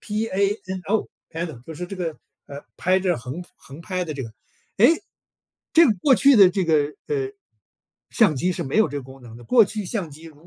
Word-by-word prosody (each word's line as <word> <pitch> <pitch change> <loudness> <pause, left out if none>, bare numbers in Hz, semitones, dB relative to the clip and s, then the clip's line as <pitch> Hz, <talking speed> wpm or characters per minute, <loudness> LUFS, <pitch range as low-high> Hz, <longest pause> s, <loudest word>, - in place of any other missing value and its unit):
P-A-N-O， 205 -1 -2 0.2
PANO 160 -7 -6
就 160 - -8
是 180 +3 -6
这 195 - -8
个， 165 -4 -4 0.3
呃， 140 0 -10
拍 185 +1 +2
着 180 -3 0
横 130 +9 -7
横 140 +4 -12
拍 185 +1 -3
的 155 -3 -6
这 135 - -5
个。 115 -2 -9 0.5
诶， 305 - +5 0.7
这 335 -1 +7
个 225 - +4
过 275 - +6
去 275 0 +5
的 195 -3 +8
这 190 0 -1
个， 150 -3 +1
呃， 410 -3 -2 0.8
相 200 - +3
机 180 +7 0
是 175 - -4
没 135 - -3
有 220 - +4
这 145 - -6
个 - - -8
功 130 0 -14
能 115 -1 -12
的， 120 - -13
过 245 -3 +5
去 210 0 -5
相 185 -8 -4
机 155 +3 -13
如 160 +1 -15
180 Hz, 260 characters per minute, -23 LUFS, 150-210 Hz, 0.8 s, 的